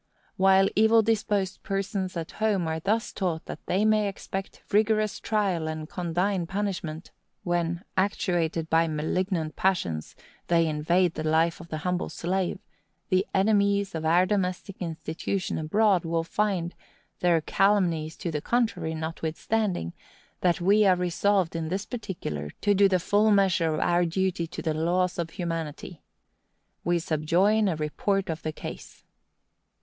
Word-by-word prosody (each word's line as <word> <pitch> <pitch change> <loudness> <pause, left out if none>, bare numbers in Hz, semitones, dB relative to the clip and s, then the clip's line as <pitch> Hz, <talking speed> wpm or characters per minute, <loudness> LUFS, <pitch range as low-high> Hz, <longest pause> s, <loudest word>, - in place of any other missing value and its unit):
While 190 0 +5
evil 220 +1 +5
disposed 205 -3 0
persons 195 -2 -2
at 165 -1 -5
home 210 -6 0
are 160 0 -2
thus 220 +7 -1
taught 175 -5 -2
that - - -8
they 195 +4 +2
may 215 -1 +3
expect 195 0 -6
rigorous 215 0 +2
trial 195 -7 0
and 155 -1 -4
condign 180 +1 -1
punishment, 185 -4 -4 0.3
when, 175 0 -1
actuated 175 -4 0
by 165 +1 +3
malignant 160 +1 -1
passions, 90 - -1 0.3
they 165 -1 +3
invade 165 +3 +1
the 155 - -4
life 160 +2 +2
of 170 - -11
the 155 - -4
humble 180 0 -1
slave, 185 +2 -2 0.5
the 185 +2 +2
enemies 200 0 +2
of 160 -1 -4
our 170 +3 +4
domestic 185 -1 -2
institution 165 +3 -3
abroad 195 +3 +2
will 165 0 -1
find, 180 -1 -1 0.5
their 175 -2 +3
calumnies 170 -3 +1
to 170 - -3
the 150 -2 -2
contrary 225 -7 0
notwithstanding, 160 - -2 0.5
that 180 -1 +2
we 200 +4 +4
are 190 -2 +5
resolved, 180 0 +1
in 165 -1 -2
this 195 +3 -2
particular, 170 - -5
to 205 - +3
do 200 0 +5
the 185 - +3
full 205 +5 +3
measure 190 -5 +3
of - - -2
our 175 0 +2
duty 175 0 -1
to 170 - -7
the 160 - 0
laws 175 +3 0
of 170 -1 -2
humanity. 165 -2 -5 0.8
We 175 0 +2
subjoin 170 +7 +2
a 180 - +1
report 185 +5 -1
of 160 - -5
the 155 - -3
case. - - -9
180 Hz, 145 wpm, -27 LUFS, 165-200 Hz, 0.8 s, While